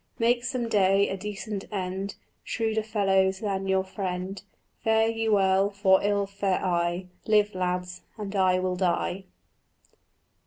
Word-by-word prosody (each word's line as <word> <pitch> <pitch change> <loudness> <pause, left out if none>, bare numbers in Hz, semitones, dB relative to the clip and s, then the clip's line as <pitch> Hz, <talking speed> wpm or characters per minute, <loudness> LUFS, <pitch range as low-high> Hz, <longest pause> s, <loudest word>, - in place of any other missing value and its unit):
"Make 240 +1 +2
some 250 -2 -2
day 200 -2 +3
a - - -2
decent 205 +1 -5
end, 190 0 -3 0.3
Shrewder 220 -1 -1
fellows 195 -3 +2
than 195 -2 -2
your 190 0 +2
friend. 190 0 -4 0.4
Fare 220 0 +3
you 225 -1 0
well, 195 0 +3
for 195 -2 +3
ill 200 0 +1
fare 195 -1 -1
I: 175 0 0 0.2
Live, 210 -1 +3
lads, 180 0 -2 0.2
and 205 -1 -5
I 185 -1 +3
will 185 0 -1
die." 180 +1 -1
195 Hz, 140 wpm, -27 LUFS, 185-210 Hz, 0.4 s, day